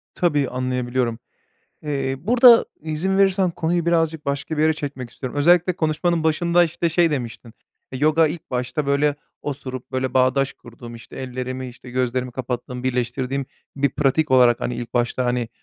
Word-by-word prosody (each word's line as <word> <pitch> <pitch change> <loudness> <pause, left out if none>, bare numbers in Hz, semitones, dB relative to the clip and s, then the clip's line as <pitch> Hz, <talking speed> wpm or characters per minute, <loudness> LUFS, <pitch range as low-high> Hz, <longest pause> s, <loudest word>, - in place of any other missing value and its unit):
Tabii, 145 -6 +1
anlayabiliyorum. 125 -2 -2 0.6
Eee, 135 -3 -2
burada 235 - +6 0.2
izin 160 +5 -1
verirsen 190 -2 +3
konuyu 170 +1 -1
birazcık 165 -2 +1
başka 140 +3 -2
bir - - +3
yere 160 0 +4
çekmek 140 -5 -6
istiyorum. 130 +3 -6
Özellikle 175 +4 +4
konuşmanın 160 0 0
başında, 170 +2 +3
işte, 170 +1 -1
şey 165 +1 +3
demiştin. 120 -4 -5 0.4
Eee, 130 - -4
yoga 155 +3 +4
ilk 155 +2 -6
başta 125 +4 -2
böyle 140 +1 +2 0.3
oturup, 130 -3 -6
böyle, 130 -1 -2
bağdaş 130 +1 +2
kurduğum, 120 0 -12
işte, 115 - -12
ellerimi, 130 0 -5
işte, 125 +1 -12
gözlerimi 125 0 -1
kapattığım, 125 0 -5
birleştirdiğim 130 +2 -2 0.3
bir 140 0 +2
pratik 145 +3 +1
olarak, 125 -2 +5
hani, 125 - -2
ilk 120 0 -7
başta, 120 +1 0
hani, 120 -1 -1
135 Hz, 155 wpm, -22 LUFS, 125-160 Hz, 0.6 s, burada